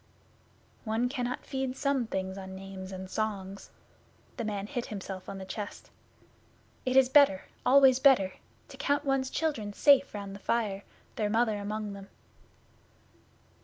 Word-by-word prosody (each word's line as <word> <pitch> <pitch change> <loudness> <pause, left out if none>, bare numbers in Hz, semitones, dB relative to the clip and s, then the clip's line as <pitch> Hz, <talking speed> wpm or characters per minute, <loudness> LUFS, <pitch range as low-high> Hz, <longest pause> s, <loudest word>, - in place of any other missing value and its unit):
'One 230 +2 0
cannot 250 -2 -3
feed 265 -1 -3
some 275 -4 0
things 190 -2 -3
on 190 -1 -8
names 190 0 -8
and 190 0 -6
songs.' 195 -2 -4 0.7
The 235 - -2
man 205 -2 -3
hit 245 +2 -4
himself 190 -2 -7
on 195 - -6
the 190 - -7
chest. 205 +2 -7 1.0
'It 255 - +1
is 265 -1 +7
better 260 -8 +5 0.2
always 265 -1 +7
better 255 -9 +5 0.4
to - - -11
count 285 +1 0
one's 270 -1 +1
children 255 -12 -2
safe 280 0 +4
round 200 -1 -6
the 200 - -9
fire, 205 -2 -1 0.3
their 210 -2 0
Mother 220 -1 +1
among 210 0 -4
them. 195 0 -10
215 Hz, 145 wpm, -30 LUFS, 195-260 Hz, 1.0 s, is